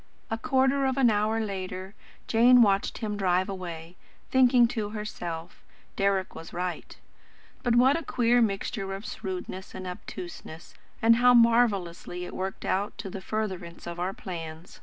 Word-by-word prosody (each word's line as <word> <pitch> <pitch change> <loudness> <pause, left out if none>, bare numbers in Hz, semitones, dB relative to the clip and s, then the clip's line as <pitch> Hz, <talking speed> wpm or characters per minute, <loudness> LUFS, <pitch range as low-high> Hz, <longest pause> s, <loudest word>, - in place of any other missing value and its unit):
A 225 - 0
quarter 270 0 +2
of 265 0 -1
an 250 -4 +5
hour 215 +2 +1
later, 190 -2 -4 0.3
Jane 240 +2 +6
watched 200 -2 +1
him 210 -2 -3
drive 185 -1 +2
away, 175 -3 -7 0.3
thinking 250 -2 +5
to 215 -3 -3
herself: 175 -6 -6 0.3
"Deryck 195 -1 +1
was 165 - -10
right. 180 0 -4 0.6
But 240 -2 +2
what 260 +4 +5
a 330 - -1
queer 245 -4 +2
mixture 195 -2 -1
of 195 - -9
shrewdness 190 -1 -6
and 185 - -6
obtuseness, 175 -2 -8 0.3
and 230 0 +6
how 245 0 +6
marvellously 200 -7 +2
it - - -9
worked 190 +1 -4
out 200 +2 -1
to 200 -4 -6
the 195 - -6
furtherance 190 -5 -4
of 170 0 -6
our 180 +2 -1
plans." 170 -5 -8
195 Hz, 155 wpm, -27 LUFS, 180-230 Hz, 0.6 s, Jane